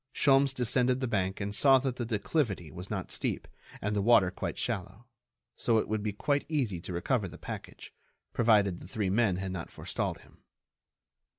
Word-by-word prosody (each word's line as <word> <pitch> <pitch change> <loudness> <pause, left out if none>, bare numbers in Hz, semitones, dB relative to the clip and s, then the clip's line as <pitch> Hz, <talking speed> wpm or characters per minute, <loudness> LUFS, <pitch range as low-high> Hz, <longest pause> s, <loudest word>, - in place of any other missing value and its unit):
Sholmes 135 -1 +4
descended 125 +1 +2
the 130 - -1
bank 95 -4 -1
and 100 0 -3
saw 135 +4 +6
that 130 -1 -2
the 120 - -3
declivity 105 - -1
was 90 +5 -8
not 95 -4 -4
steep - - -2 0.4
and 105 +1 0
the 100 - +1
water 100 -4 +5
quite - - -4
shallow, 95 +5 -3 0.5
so 115 - +2
it 110 - +1
would 110 0 -1
be 105 0 -1
quite 145 +8 0
easy 120 - -1
to 90 - -7
recover 100 +5 0
the 85 - -10
package, - - -8 0.4
provided 105 -6 +3
the - - -11
three 100 -1 -1
men 105 -3 +3
had 95 +1 -3
not 90 -3 -5
forestalled - - -3
him. - - -21
105 Hz, 185 wpm, -30 LUFS, 95-125 Hz, 0.5 s, saw